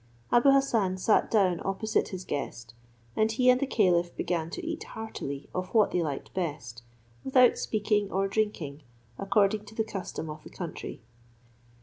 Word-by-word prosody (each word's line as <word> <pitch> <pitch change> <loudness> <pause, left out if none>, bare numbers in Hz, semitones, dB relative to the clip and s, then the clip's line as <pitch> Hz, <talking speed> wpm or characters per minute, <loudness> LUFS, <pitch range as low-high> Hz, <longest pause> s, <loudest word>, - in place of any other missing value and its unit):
Abou 240 +3 +6
Hassan 230 -9 +3
sat 210 +3 +2
down 185 -6 +2
opposite 195 +3 0
his 185 -1 -7
guest, 115 -5 -5 0.4
and 220 +1 +2
he 250 +3 +5
and 250 - +2
the 275 - 0
caliph 175 -8 +2
began 170 -2 -2
to 335 - -6
eat 330 0 -4
heartily 140 -11 -6
of 185 0 -2
what 215 -2 +5
they 180 - +1
liked 145 -4 -4
best, 145 -10 -4 0.4
without 255 -2 +5
speaking 210 -2 0
or 195 +1 +1
drinking, 195 -9 -2 0.4
according 205 +1 +2
to 215 - -13
the 220 - +1
custom 195 -6 -5
of 155 0 -8
the - - -11
country. 170 -9 -7
195 Hz, 160 wpm, -28 LUFS, 170-220 Hz, 0.4 s, Abou